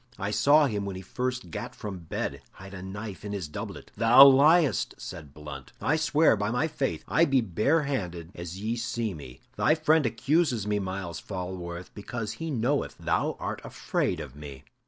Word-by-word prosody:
I 100 +2 -2
saw 145 +8 +5
him 105 -6 -1
when 100 -1 -4
he 95 - -7
first 125 -3 -3
gat - - -6
from 100 -3 -6
bed 80 - -4
hide 95 0 -12
a 95 - -7
knife 100 +1 -7
in 105 0 -5
his 95 -6 -3
doublet." 75 - -7
"Thou 115 +5 +9
liest!" 150 +3 +4
said 75 -5 -8
Blunt. 70 -2 -9
"I 155 - +1
swear, 155 -3 +4
by 105 0 -1
my 125 +7 +1
faith, 145 -4 -2
I 165 - +4
be 135 -4 +3
barehanded 105 - 0
as 85 +2 -7
ye 110 +3 -1
see 115 -2 -2
me! 70 -6 -11 0.2
Thy 155 - +4
friend 155 -3 +3
accuses 120 - +1
me, 105 0 0
Myles 95 -2 -4
Falworth, 90 -2 -6
because 105 +1 -5
he 160 +9 -5
knoweth 135 +1 0
thou - - 0
art - - -4
afraid - - -2
of 65 - -8
me." 70 -2 -10
105 Hz, 180 wpm, -28 LUFS, 90-135 Hz, 0.2 s, Thou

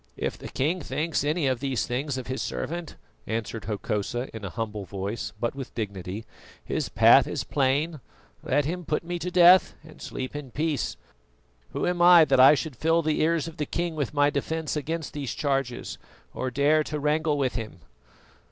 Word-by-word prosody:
"If - - -2
the - - -9
King 165 +7 -1
thinks 155 +1 -1
any 150 +1 0
of 130 -2 +1
these 135 -2 -1
things 135 +2 -2
of 130 - -5
his 130 +1 -3
servant," 170 0 -4 0.3
answered 110 0 -3
Hokosa 105 +4 -3
in 110 - -7
a 100 - -4
humble 105 0 -4
voice, 100 +3 -4
but 120 +1 -1
with 135 -2 -8
dignity, 100 -1 -5 0.4
"his - - -2
path - - +6
is - - -3
plain: 145 +3 0 0.4
let 145 +2 +1
him 175 +4 -3
put 150 0 -1
me 175 +1 -4
to 180 - -3
death 180 +1 +6
and 155 0 -15
sleep 130 +2 -5
in 145 -3 -6
peace. 150 +1 -2 0.8
Who - - -1
am 175 -1 0
I 175 -2 +8
that 135 -3 +3
I 135 +4 +9
should 140 +1 -4
full 165 +3 +2
the 155 0 0
ears 165 0 +1
of 160 -2 -8
a - - +1
king 170 -1 -2
with 145 -6 -2
my 145 0 +3
defence 160 +3 -2
against 160 +2 -3
these 140 -4 -4
charges, 135 -4 -2 0.3
or 130 - -2
dare 145 +4 +3
to 150 - -3
wrangle 150 +1 +1
with 130 -5 0
him?" 110 0 -6
145 Hz, 190 wpm, -26 LUFS, 125-160 Hz, 0.8 s, I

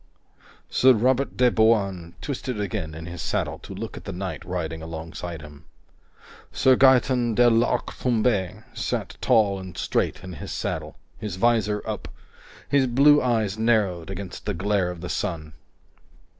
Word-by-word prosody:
Sir 130 0 +5
Robert 130 +4 +1
de 125 -1 +4
Bouain 100 -7 +1
twisted 130 -5 -4
again 100 -6 -3
in 80 +1 -8
his 85 0 -7
saddle - - -2
to - - -9
look - - -6
at - - -10
the - - -4
knight 95 +1 -5
riding 80 -3 -4
alongside 80 0 -7
him. 75 +1 -13 0.9
Sir 130 -1 +4
Gaeton 125 -3 +4
de 120 +1 +5
l'Arc 115 +1 +2
Tombé 110 -6 0
sat - - -3
tall 105 -5 +3
and 95 -2 -9
straight - - -1
in 90 -1 -7
his 75 - -7
saddle, - - -4 0.2
his 105 -5 -4
visor 105 -1 +1
up, - - -4 0.6
his 140 -2 +3
blue 145 +4 +5
eyes 110 -4 0
narrowed 105 -7 +1
against 95 0 -7
the 105 - -1
glare 95 0 0
of 90 -2 -7
the 90 - -5
sun. 80 -4 -3
105 Hz, 155 wpm, -24 LUFS, 90-120 Hz, 0.9 s, Sir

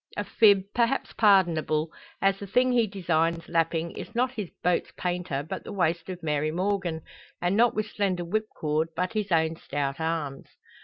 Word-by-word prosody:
A - - 0
fib, 200 -4 +5
perhaps 240 +3 +1
pardonable, 165 -6 +3 0.3
as 195 0 +3
the 200 - -7
thing 250 +6 +3
he 235 -3 +3
designs 170 -4 0
lapping 165 0 0
is 230 - -9
not 250 +2 +2
his 210 -8 -5
boat's 180 0 +1
painter, 175 -6 -2
but - - -5
the - - -8
waist 175 -2 0
of 180 -2 -6
Mary 150 -1 0
Morgan, 180 -1 -1 0.4
and 175 +2 +1
not 235 +2 +4
with 215 0 0
slender 195 -5 -1
whipcord, 165 -6 -1
but 180 +5 -1
his 210 -3 -2
own 160 -1 +2
stout 140 -3 -3
arms. 160 -4 -3
180 Hz, 170 wpm, -27 LUFS, 160-205 Hz, 0.4 s, fib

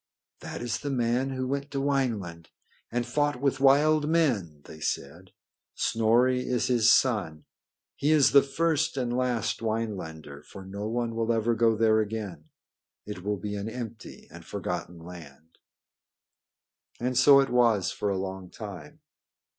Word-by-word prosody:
"That - - -7
is 120 -2 -2
the 145 - -4
man 125 0 0
who 130 -1 -3
went 140 +2 -3
to 140 - -5
Wineland 115 - -2 0.4
and 120 0 -1
fought 145 +2 0
with 140 0 0
wild 150 +3 +4
men," 115 - 0
they 80 - -12
said. 80 +5 -4 0.4
"Snorri 120 +3 +2
is 125 -2 -1
his 120 -3 +4
son. 95 - +1 0.5
He 145 - 0
is 150 -3 +5
the 140 - +7
first 160 +1 0
and 120 -2 -1
last 120 -4 -1
Winelander, 95 -10 -4
for 95 +4 -11
no 100 +2 -5
one 120 0 -2
will 115 0 -1
ever 115 0 +1
go 115 0 +3
there 110 0 +3
again. 105 -7 -4 0.6
It 105 -4 -7
will 105 +1 -1
be 105 +1 -5
an 100 +2 -4
empty 115 -2 -8
and 85 0 -11
forgotten 90 -3 -5
land." 80 -2 -13 1.4
And 125 +1 -2
so 140 +2 +7
it 135 -2 +1
was 115 -6 +3
for 105 - -2
a 100 - -1
long 95 -1 -5
time. 95 -9 -10
115 Hz, 155 wpm, -27 LUFS, 95-130 Hz, 1.4 s, the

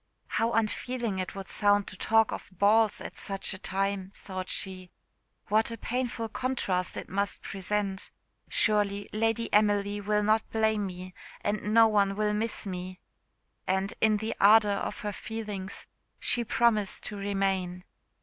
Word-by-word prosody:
"How 230 +1 +1
unfeeling 225 -1 -1
it 185 - -4
would 195 -1 -6
sound 205 -1 +3
to 185 - -8
talk 225 +3 +3
of - - -6
balls 210 +3 +3
at - - -8
such 195 +1 -2
a 190 - -8
time," 195 0 -1
thought 185 -1 -6
she; 185 -2 -1 0.6
"what 220 +2 +2
a 230 - -5
painful 245 -2 -2
contrast 220 -7 -1
must 200 +2 -1
it - - -36
present! 195 0 -2 0.4
Surely 205 -2 +2
Lady 225 +1 0
Emily 205 -1 +3
will 210 +1 +1
not 215 +1 +2
blame 220 -2 +1
me, 185 0 -8 0.3
and 210 0 -1
no 225 0 +7
one 200 -2 +2
will 210 0 +1
miss 220 +1 -2
me 185 -1 -5 0.3
" - - -49 0.3
And, 190 +1 0
in 215 -1 +4
the 220 +2 -3
ardour 210 +1 +6
of 200 - -3
her 210 - -2
feelings, 210 -2 -5 0.3
she 240 - +2
promised 215 -3 +2
to 210 - -4
remain. 195 -3 -1
205 Hz, 155 wpm, -29 LUFS, 195-220 Hz, 0.6 s, no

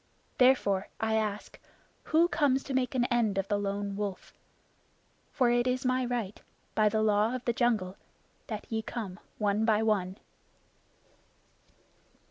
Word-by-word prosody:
Therefore, 250 -7 +4
I 220 0 0
ask, 215 -2 -2 0.5
who 330 +2 +4
comes 280 -6 +1
to 275 - -5
make 260 0 0
an 245 -1 +2
end 225 -5 +2
of 195 0 0
the 205 - +1
Lone 200 0 -3
Wolf? 200 -2 -5 1.0
For 250 -4 +2
it 240 +1 +2
is 255 +1 -1
my 255 0 +1
right, 235 -5 -3 0.3
by 215 -1 +3
the 215 +1 +1
Law 215 +3 +2
of 250 - -6
the 235 - +1
Jungle, 220 -7 0 0.5
that 215 -2 -5
ye 220 -1 -2
come 210 -4 -6 0.2
one 210 0 +1
by 220 -1 +3
one." 195 -3 0
220 Hz, 145 wpm, -29 LUFS, 205-250 Hz, 1.0 s, Therefore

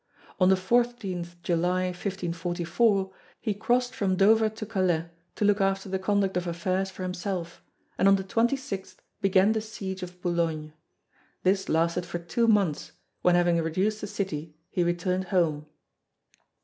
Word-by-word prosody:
On 185 -1 +5
the 190 - +6
14 195 -3 0 0.2
July, 180 +2 +1
1544, 180 +2 0 0.3
he 215 -3 -1
crossed 245 +4 +1
from 190 -2 0
Dover 220 +3 +5
to 220 0 -7
Calais 185 -6 +1 0.3
to 210 - 0
look 205 0 +3
after 195 0 0
the 190 0 -1
conduct 195 -1 +1
of 180 0 -1
affairs 185 +3 -1
for 185 0 -8
himself, 180 -1 -4 0.4
and 195 - +5
on 195 - +7
the 195 - -2
26th 230 0 -1 0.3
began 195 +1 +4
the 220 0 0
siege 195 -3 -6
of 180 0 -8
Boulogne. 165 -4 -1 0.7
This 190 +1 +1
lasted 170 +2 +1
for 175 - -3
two 175 +8 0
months 200 -9 +2 0.3
when 180 -1 +4
having 175 -1 +3
reduced 190 +7 0
the 210 - -4
city 160 -6 -4 0.2
he 180 - +1
returned 180 +2 0
home. 160 -5 0
185 Hz, 150 wpm, -27 LUFS, 175-200 Hz, 0.7 s, on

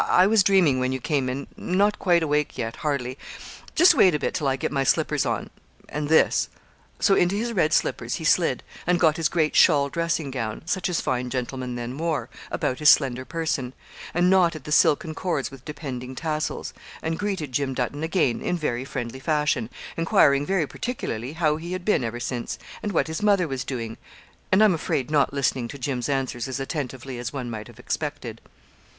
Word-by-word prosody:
I 180 - +6
was 215 +1 +5
dreaming 185 -9 +4
when 130 0 0
you 130 - -2
came 135 -1 0
in; 135 +2 -4
not 200 +3 +1
quite 175 -3 +3
awake 150 -1 0
yet, 115 0 -3
hardly; 140 -3 -2 0.6
just 350 +2 +7
wait 185 - +5
a - - +2
bit 145 - -2
till 145 - -1
I 135 - +2
get 135 - -3
my 135 -2 +1
slippers 135 - +1
on; - - -2 0.4
and 150 0 -3
this 160 - +4 0.2
' - - -34
So 200 - +4
into 180 0 +3
his 230 +3 -2
red 170 -6 +2
slippers - - 0
he - - -6
slid, - - +2 0.2
and 175 0 +3
got 160 -2 +4
his 165 -1 +1
great 155 -3 +1
shawl 145 -4 +5
dressing 165 -3 -1
gown, 115 -4 -4
such 185 +2 -1
as 175 - 0
fine 125 0 -1
gentlemen 125 0 -3
then 120 +1 -5
wore, 165 -3 -1 0.2
about 130 - -2
his 150 -1 +6
slender 130 -3 +4
person, 150 -6 -2 0.4
and 175 +1 +2
knotted 175 -5 +3
the 150 - -7
silken 155 +1 +3
cords 155 -8 -2
with 135 -2 -13
depending 130 -4 -6
tassels, 155 +1 -3 0.3
and 160 0 -2
greeted 190 -9 -2
Jim 135 +1 -1
Dutton 135 +3 -2
again 160 -7 +1
in 180 - -1
very 130 -6 -2
friendly 120 0 -5
fashion, 150 -5 0 0.3
enquiring 145 -3 +3
very 190 -5 +1
particularly 135 - -4
how 155 -2 +1
he 170 +3 -6
had 185 -1 -5
been 210 -11 +2
ever 120 +1 -3
since, 120 0 -4 0.2
and 210 - -2
what 170 - +2
his 160 +3 -4
mother 200 -4 +3
was 135 -3 -3
doing; 115 -4 -5 0.5
and 190 +3 +6
I'm 210 -3 +5
afraid 150 -4 -2
not 145 -2 +3
listening 135 -3 0
to 140 - -8
Jim's 130 -1 -2
answers 135 -3 -1
as 130 0 -4
attentively 135 -3 -4
as 120 -1 -4
one 125 -4 -5
might 110 -1 -6
have 120 - -15
expected. 130 -3 -4
145 Hz, 200 wpm, -24 LUFS, 130-170 Hz, 0.6 s, just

